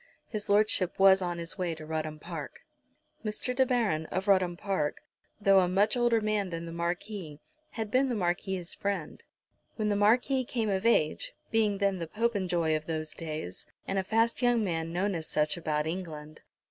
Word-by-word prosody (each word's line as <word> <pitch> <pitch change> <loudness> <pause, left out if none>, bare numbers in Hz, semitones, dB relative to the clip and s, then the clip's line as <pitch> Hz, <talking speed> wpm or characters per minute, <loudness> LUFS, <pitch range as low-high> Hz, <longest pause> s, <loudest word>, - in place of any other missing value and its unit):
His 210 -2 -5
Lordship 205 -3 +2
was 195 0 +6
on 175 -1 -2
his 170 +3 -6
way 175 -3 -1
to 155 0 -9
Rudham 155 -1 -3
Park. - - -7 0.6
Mr. 220 +4 -2
De 260 0 +3
Baron, 210 -11 +1
of 190 +2 -3
Rudham 185 -3 +3
Park, 185 -7 -2 0.4
though 195 -2 +6
a 180 - +3
much 200 +5 +2
older 240 -2 +3
man 210 -2 0
than 165 -1 -5
the 165 - -7
Marquis, 170 -1 -4 0.3
had 220 -2 -4
been 265 +1 +3
the 245 - 0
Marquis's 180 -1 -1
friend, 195 -6 -3 0.5
when 215 -2 0
the 205 - +2
Marquis 245 +6 +3
came 230 -3 -2
of 195 +3 +1
age, 155 -10 +2 0.2
being 215 -3 +2
then 195 -2 +1
the 165 - -4
Popenjoy 185 -6 0
of 155 0 -4
those 155 -1 -2
days 155 - -6 0.2
and 195 0 0
a - - 0
fast 225 +5 +1
young 245 -2 +3
man 165 -4 -2
known 190 +4 0
as 160 -3 -4
such 150 0 +1
about 155 -3 -1
England. 155 -3 -6
190 Hz, 185 wpm, -29 LUFS, 165-215 Hz, 0.6 s, was